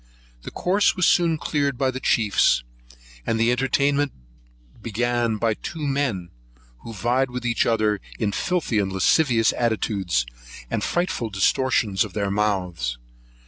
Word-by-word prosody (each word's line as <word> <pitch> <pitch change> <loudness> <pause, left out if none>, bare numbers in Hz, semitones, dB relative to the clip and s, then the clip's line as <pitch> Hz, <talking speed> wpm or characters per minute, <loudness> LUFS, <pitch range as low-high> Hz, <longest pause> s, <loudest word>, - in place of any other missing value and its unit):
The - - -7
course 195 +3 +1
was 180 - +2
soon 170 -2 +3
cleared 140 -3 -1
by 135 0 +1
the 130 - -5
chiefs, 105 - +2 0.6
and 110 - -1
the 115 +1 +3
entertainment 140 +2 +1 0.7
began 120 0 0
by 115 0 +1
two 155 +7 -6
men, 135 -11 -1 0.5
who 115 - -9
vied 120 +5 0
with 125 -1 -6
each 115 -1 +1
other 110 -3 +1 0.2
in 105 -3 -1
filthy 155 - 0
lascivious 115 - +2
attitudes, 100 - 0 0.5
and - - -1
frightful 175 -10 -1
distortions 105 0 +1
of - - -8
their 100 -2 -1
mouths. 90 - -1
115 Hz, 135 wpm, -23 LUFS, 105-135 Hz, 0.7 s, soon